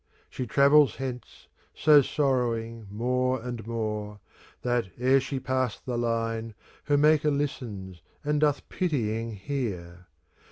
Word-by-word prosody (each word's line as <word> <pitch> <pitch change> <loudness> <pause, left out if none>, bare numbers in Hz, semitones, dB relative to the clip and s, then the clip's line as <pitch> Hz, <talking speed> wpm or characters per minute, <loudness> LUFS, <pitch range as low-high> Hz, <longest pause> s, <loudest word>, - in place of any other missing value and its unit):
She 125 - -4
travels 140 +4 +5
hence, 130 -2 -7 0.3
so 150 -1 +6
sorrowing 115 -6 -1
more 125 +4 0
and 120 -2 -6
more, 105 -2 -3 0.4
That, 120 -3 0
ere 130 +2 +4
she 135 0 -3
pass 130 -2 -1
the 125 - -4
line. 115 -1 -2 0.3
Her 145 -1 +3
Maker 150 +1 +4
listens 110 - -4 0.2
and 150 0 0
doth 145 -2 +1
pitying 115 - -1
hear. 95 -7 -5
125 Hz, 120 wpm, -27 LUFS, 115-140 Hz, 0.4 s, so